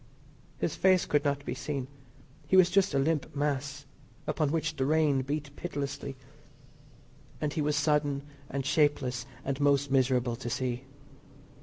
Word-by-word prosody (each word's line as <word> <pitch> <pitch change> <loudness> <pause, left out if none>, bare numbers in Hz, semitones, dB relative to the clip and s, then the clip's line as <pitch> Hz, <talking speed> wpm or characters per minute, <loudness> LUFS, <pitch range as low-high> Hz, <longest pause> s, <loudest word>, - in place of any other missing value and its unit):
His - - -1
face 185 -2 +4
could 145 -1 +2
not 145 -1 -1
be - - -2
seen. 135 -1 -3 0.6
He 190 - +4
was 180 -1 +6
just 195 -4 +3
a - - +4
limp 150 +1 0
mass, 140 -1 -2 0.4
upon 150 -3 0
which 165 0 -1
the 135 - 0
rain 150 -3 +3
beat 145 +1 -4
pitilessly, 140 -4 -4 1.2
and 150 -1 -1
he 155 - -1
was 150 0 +1
sodden 145 -1 +1 0.3
and 135 -1 -3
shapeless, 140 -4 +1 0.2
and 135 0 -2
most 140 -1 +3
miserable 130 -2 +2
to 120 -1 -5
see. 125 +1 -2
145 Hz, 150 wpm, -30 LUFS, 135-150 Hz, 1.2 s, was